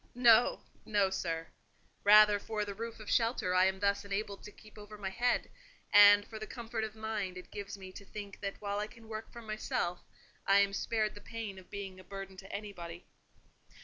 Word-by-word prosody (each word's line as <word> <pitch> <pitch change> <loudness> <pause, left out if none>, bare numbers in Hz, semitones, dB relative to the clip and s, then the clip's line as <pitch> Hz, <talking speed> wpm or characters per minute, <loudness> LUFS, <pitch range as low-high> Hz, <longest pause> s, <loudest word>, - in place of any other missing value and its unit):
"No—no, 220 -4 +3
sir. 165 -3 -3 0.5
Rather 210 0 +8
for 210 0 -3
the 200 - -5
roof 230 +3 -6
of 215 - -10
shelter 230 -6 +1
I 185 0 +5
am 190 0 0
thus 200 0 +1
enabled 200 0 -3
to 210 - -10
keep 215 +1 -16
over 210 0 -10
my 195 -2 -4
head; 245 +4 0 0.4
and 205 0 +9
for 220 - -8
the 215 - -6
comfort 230 -2 -4
of 220 0 -5
mind 215 -4 -3
it 185 - -10
gives 200 0 -6
me 190 -1 -10
to 200 - -10
think 205 0 -8
that 200 -1 -4
while 205 0 -2
I 210 - -2
can 225 0 -16
work 220 0 -7
for 235 -1 -10
myself, 215 -5 -2 0.5
I 195 - +6
am 200 0 +1
spared 215 +1 0
the 205 - -11
pain 220 -5 -6
of 185 - -17
being 195 -2 -6
a - - -12
burden 195 0 -8
to 195 +1 -11
anybody." 180 -5 -7
205 Hz, 200 wpm, -33 LUFS, 195-220 Hz, 0.5 s, and